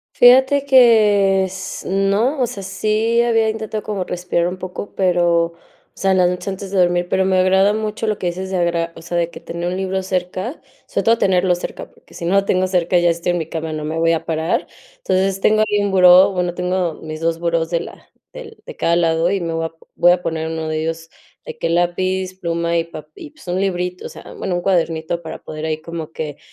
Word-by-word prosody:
Fíjate 265 +3 +5
que 210 -7 +5
s 190 0 -7
no, 200 +9 +1
o - - +4
sea, 200 -3 -7
sí 220 +4 +1
había 225 -2 +2
intentado 220 -1 -4
como 200 -3 -3
respirar 180 -1 -1
un 185 - -6
poco, 185 +2 -7
pero, 175 -3 +2
o 170 - -10 0.4
sea, 195 0 +1
las 180 -1 +4
noches 180 +2 -4
antes 195 0 -6
de 195 - +1
dormir, 175 0 +2
pero 190 - +2
me 190 0 +2
agrada 190 +2 +4
mucho 215 +1 -3
lo 215 -1 0
que 180 - -2
dices 185 +2 -4
de 190 - 0
agarrar, 170 -1 0
o - - -10
sea, 170 +1 -6
de 170 -1 0
que - - -11
tener 170 +1 -4
un 180 - -3
libro 190 0 -2
cerca, 185 - -3 0.2
sobre - - -3
todo 230 0 +4
tenerlo 180 -2 +2
cerca, 175 - -7
porque - - -23
si 170 - -6
no 175 - 0
lo 200 0 +3
tengo 185 -1 +1
cerca 180 -1 +1
y - - -1
ya 175 - +4
estoy 170 +1 0
en 175 - 0
mi 160 - -3
cama, 160 -1 -4
no 155 -1 -4
me 155 +2 -3
voy 165 0 +2
a 165 - -1
parar. 160 0 -1 0.3
Entonces, 195 - 0
tengo 215 +2 +3
ahí 205 -1 +1
un 200 - -1
buró, 185 +1 +7
bueno, 180 -1 -1
tengo 180 -2 -1
mis 155 0 -8
2 165 0 0
burós 170 -1 0
de 170 - 0
la - - -10 0.3
del 475 -3 -11
de - - -9
cada 170 - +2
lado 165 0 +2
y 195 0 -1
me 165 -1 -3
voy 165 0 -1
a 165 - -5 0.2
voy 175 0 +5
a 180 - -2
poner 160 -2 -3
1 160 -1 -4
de 155 0 -2
ellos, 165 0 -4 0.4
de 480 -1 -8
que - - -2
lápiz, 185 +2 -1
pluma, 170 0 -1
y 165 - +1
un 165 - -23
pape 155 -1 -10
pues, - - -17
un 180 - 0
librito, 180 -2 -2
o - - -5
sea, - - -12
bueno, 180 -2 -2
un 175 - -2
cuadernito 170 -2 0
para 160 - -8
poder 155 0 -6
ahí 155 -1 -2
como 165 -1 -7
que 150 -3 -5
180 Hz, 240 wpm, -19 LUFS, 170-195 Hz, 0.4 s, buró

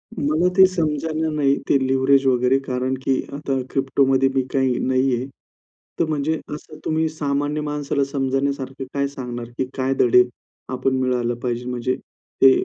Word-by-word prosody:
मला 155 +5 +1
ते 190 - +9
समजणा 160 -2 -1
नाही 145 -2 +2
ते - - +5
लिव्हरेज 135 +1 +3
वगैरे 125 +1 +3
कारण 130 +1 -1
की 135 - +3 0.2
आता 140 -1 -3 0.2
Cryptoमध्ये 135 0 +2
मी 135 - +3
काही 130 -3 +2
नाहीये. 130 -1 +1 0.7
तर 170 - +3
म्हणजे 155 +1 0 0.2
असं 155 0 -12
तुम्ही 160 0 +1
सामान्य 145 0 -1
माणसाला 145 -1 -1
समजण्यासारखं 135 0 -1
काय 140 0 0
सांगणार 120 -3 -6
की 130 - 0
काय 130 0 +1
धडे 125 0 +6 0.5
आपण 130 +1 0
मिळायला 125 -2 0
पाहिजे 120 0 -2
म्हणजे 125 +1 -1 0.5
ते 135 - +9
135 Hz, 145 wpm, -22 LUFS, 130-150 Hz, 0.7 s, ते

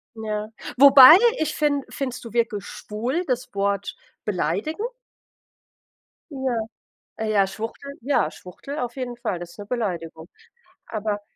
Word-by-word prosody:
Ja, 215 -1 -4 0.3
wobei, 275 +2 +10 0.2
ich 315 - -1
finde 285 -2 0
findest 255 -3 -5
du 230 - -10
wirklich 230 -4 0
„schwul“ 245 +11 -3
das 250 -3 -2
Wort 200 0 -1 0.3
beleidigend? 210 - -1 1.4
Ja, 265 -3 -2 0.6
äh, 220 -1 -2
ja, 200 -2 +4
Schwuchtel 225 +7 -7
ja, 275 +4 +1
Schwuchtel 275 - -9
auf 240 0 -4
jeden 250 -2 -4
Fall, 205 -6 -3
das 175 0 -8
ist - - -18
'ne 205 - -8
Beleidigung. 175 -8 -4 0.6
Aber 210 -1 -3
230 Hz, 130 wpm, -23 LUFS, 205-265 Hz, 1.4 s, wobei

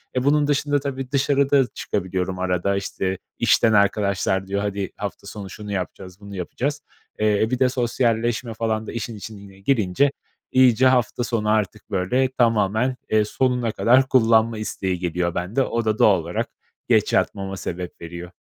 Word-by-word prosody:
E, 125 - +1
bunun 145 +1 +3
dışında 145 0 +1
tabii 135 -1 -5
dışarı 140 0 +2
da 140 -2 +6
çıkabiliyorum 95 -1 -3
arada. 90 +1 0
İşte, 95 -1 -2 0.2
işten 110 -1 +4
arkadaşlar 100 -2 +1
diyor, 100 +1 -1
hadi 100 -2 -3
hafta - - -6
sonu 100 -2 -7
şunu 105 +2 -8
yapacağız, 90 0 -5
bunu 100 -1 -10
yapacağız. 140 - -3 0.4
Eee, 105 0 +2
bir 125 - 0
de 130 - +4
sosyalleşme 120 -1 0
falan 110 -1 -2
da - - -5
işin 115 0 -5
içine 100 -1 -10
girince 110 +3 +2 0.4
iyice 130 0 +5
hafta 125 -1 +2
sonu 115 -3 -1
artık, 105 -3 -1
böyle, 125 +8 +1
tamamen, 115 0 +2
eee, 110 -1 +3
sonuna 125 0 0
kadar 130 +4 +4
kullanma 115 -2 +4
isteği 95 -4 -3
geliyor 85 -1 -1
bende. 95 +9 -1
O 115 -2 -2
da 110 -1 0
doğal 100 -4 +5
olarak 85 +2 -3 0.4
geç - - +3
yatmama 95 -1 0
sebep 90 -1 -6
veriyor. 85 +1 -8
110 Hz, 160 wpm, -22 LUFS, 95-125 Hz, 0.4 s, da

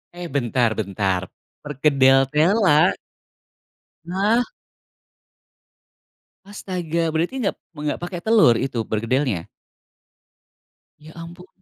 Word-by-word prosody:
Eh 175 -1 -7
bentar 120 -4 0
bentar, 95 -3 -1 0.4
perkedel 135 -2 +3
tela? 170 +1 +3 1.2
Hah? 210 +6 +2 2.0
Astaga, 175 -5 -3
berarti 165 +11 -2
enggak 215 -6 -1 0.2
enggak 150 -2 -4
pake 175 0 -5
telur 200 - +4
itu 125 -4 -2
perkedelnya? 115 - -1 1.5
Ya 155 +1 -14
ampun. 170 +2 -11
150 Hz, 85 wpm, -21 LUFS, 130-180 Hz, 2.0 s, telur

